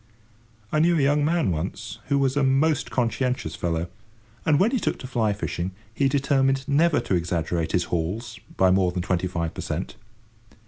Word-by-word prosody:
I 155 - +2
knew 170 +2 +4
a - - +2
young 145 +1 +3
man 160 - +2
once, 95 +6 -4
he 140 - +3
was 135 -1 +2
a 145 - +2
most 135 +3 +2
conscientious 125 - -1
fellow, 85 -1 -1 0.6
and, 150 -2 +4
when 215 +5 +3
he 260 - +1
took - - -1
to 130 - -8
fly 115 -5 +1
fishing, 95 -2 -3 0.2
he 135 +3 +2
determined 135 -1 +1
never 155 +2 +3
to - - -2
exaggerate 85 -1 -1
his 90 - +2
hauls 100 +8 -3 0.2
by 95 -1 +5
more 95 -1 +3
than 90 0 -3
twenty 90 0 0
five 85 -2 -3
per - - -6
cent. - - -4
120 Hz, 185 wpm, -25 LUFS, 90-140 Hz, 0.6 s, by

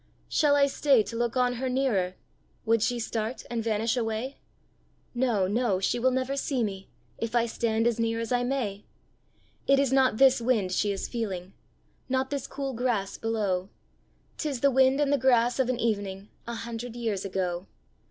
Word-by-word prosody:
Shall 295 -3 +3
I 285 -1 +5
stay 275 -4 +3
to 230 - -7
look 235 +1 -1
on 245 -1 +2
her 260 - 0
nearer? 225 -9 0 0.5
Would 225 -1 +3
she 245 +2 +1
start 225 +1 -3
and 230 -2 -1
vanish 225 +1 0
away? 230 +3 -2 0.8
No, 240 -6 +1
no; 210 -2 +1
she 230 +5 0
will 255 +2 +3
never 260 +1 -1
see 275 -3 -1
me, 195 -2 -4 0.3
If 230 +1 -3
I 235 -1 +4
stand 225 -1 0
as 235 -1 +1
near 230 0 0
as 230 0 -4
I 245 0 +2
may! 245 -6 -2 0.8
It 275 - +5
is 275 -1 +2
not 260 -4 +4
this 265 -1 +5
wind 225 -6 +1
she 205 +2 +1
is 195 - -3
feeling, 195 -6 -4 0.6
Not 260 +1 0
this 280 -1 -3
cool 275 -1 -4
grass 225 -5 -1
below; 205 -5 -1 0.7
'Tis 280 -6 -2
the 280 - +4
wind 265 +1 +4
and 290 -1 +2
the 285 - +2
grass 245 -1 +3
of 260 -1 +2
an 250 -1 -1
evening 205 -3 -2 0.2
A 235 - -4
hundred 230 +1 -6
years 225 -5 -2
ago. 185 -2 -2
235 Hz, 180 wpm, -27 LUFS, 215-260 Hz, 0.8 s, I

